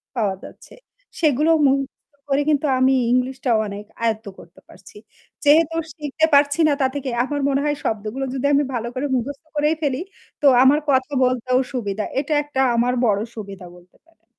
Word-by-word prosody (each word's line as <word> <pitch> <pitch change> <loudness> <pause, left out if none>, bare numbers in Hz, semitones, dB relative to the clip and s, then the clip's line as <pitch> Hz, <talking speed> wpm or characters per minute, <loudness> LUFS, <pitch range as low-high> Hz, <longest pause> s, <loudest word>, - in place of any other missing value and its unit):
পাওয়া 205 -5 0
যাচ্ছে - - -13 0.4
সেগুলো 305 0 +2
মুখস্ত 275 +2 -1 0.2
করে 275 +1 +2
কিন্তু 295 0 +1
আমি 260 +1 +4 0.2
ইংলিশটাও 255 -1 +1
অনেক 205 +1 -7 0.2
আয়ত্ত 220 -1 -1
করতে 170 - -16
পারছি। 190 - -16 0.5
যেহেতু 315 +2 +4 0.2
শিখতে 300 0 0
পারছি 285 +2 +4
না 295 - +3
তা 265 - +4
থেকে 280 -2 -3
আমার 285 +2 -3
মনে 275 0 +1
হয় 295 -1 0
শব্দগুলো 220 +5 -3
যদি 270 0 -3
আমি 285 - +3
ভালো 235 -1 -3
করে 260 +3 -2
মুখস্থ 270 +4 -4
করেই 300 +2 +2
ফেলি 275 -2 -1 0.4
তো 290 - +4 0.2
আমার 280 +3 +5
কথা 265 +1 +2
বলতেও 255 0 +1
সুবিধা 210 -4 -3 0.2
এটা 295 +2 -2
একটা 290 -2 -5 0.2
আমার 240 +2 +1
বড়ো 205 -2 +1
সুবিধা 200 -4 -8
বলতে 180 +1 -22
পারেন। 330 0 -32
265 Hz, 170 wpm, -21 LUFS, 230-290 Hz, 0.5 s, আমার